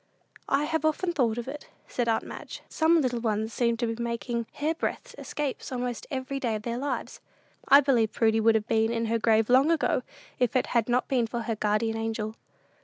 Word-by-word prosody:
"I 275 +1 +2
have 320 +1 -1
often 330 +3 +1
thought 240 -7 +1
of 240 - -4
it," 290 +2 -7 0.2
said 240 -2 -1
aunt 225 - +1
Madge. - - -8
"Some 325 +1 +3
little 250 -3 0
ones 220 -1 -1
seem 235 -1 +1
to 240 - 0
be 230 +1 -3
making 235 0 -2
hair 305 +2 -1
breadth - - -4
escapes 290 -3 -4
almost 245 -2 -3
every 265 0 -3
day 235 -4 -1
of 210 - -5
their 235 +1 -3
lives. 285 +2 -4 0.5
I 280 +1 +8
believe 240 -6 +2
Prudy 225 -1 +2
would 225 0 +4
have 220 0 0
been 225 0 +2
in 230 0 -1
her 230 +1 0
grave 220 -1 +3
long 260 +5 +5
ago, 320 -5 +2 0.4
if 250 -1 +1
it 255 - +3
had 235 -1 +2
not 245 +1 +1
been 250 -4 +1
for 235 +1 -3
her 225 -1 -2
guardian 215 +2 0
angel." 225 -1 -3
235 Hz, 210 wpm, -27 LUFS, 225-270 Hz, 0.5 s, I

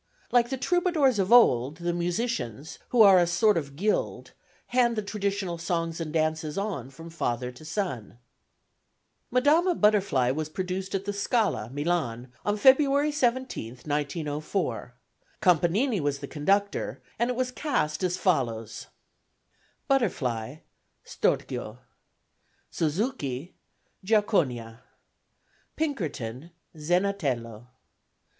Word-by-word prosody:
Like 240 -1 +3
the 265 - -2
troubadours 315 - +2
of 190 +1 0
old, 145 - +5
the 175 0 -2
musicians, 175 - -3
who 240 -3 +6
are 195 -3 +8
a 175 - +3
sort 185 +5 +3
of 140 -4 -3
guild, 210 +7 -1 0.4
hand 240 -1 +3
the 215 - -2
traditional 200 -4 -2
songs 165 -1 -2
and 155 -2 -4
dances 155 0 -1
on 195 - -3
from 165 +5 -11
father 125 -6 -2
to 125 +5 -15
son. 155 - -4 1.1
Madama 310 +8 +3
Butterfly 200 - +3
was 155 +2 -3
produced 185 +3 -4
at 195 0 -2
the 205 - -2
Scala, 200 - 0
Milan, 135 -5 -2
on 205 0 0
February 280 +4 +5
17, 260 - -1
1904. 150 - -3 0.4
Canpanini 185 - +2
was 145 -1 0
the - - -7
conductor, 200 +7 0 0.2
and 235 +1 +1
it 250 - -1
was 255 0 -1
cast 200 - -1
as 180 -1 0
follows: 115 - -1 1.0
Butterfly 135 - 0 0.5
STORCHIO. 110 +2 -2 0.9
Suzuki 160 - -2 0.5
GIACONIA. 150 - +1 1.0
Pinkerton 160 - -3 0.3
ZENATELLO. 150 - -1
175 Hz, 110 wpm, -27 LUFS, 145-215 Hz, 1.1 s, are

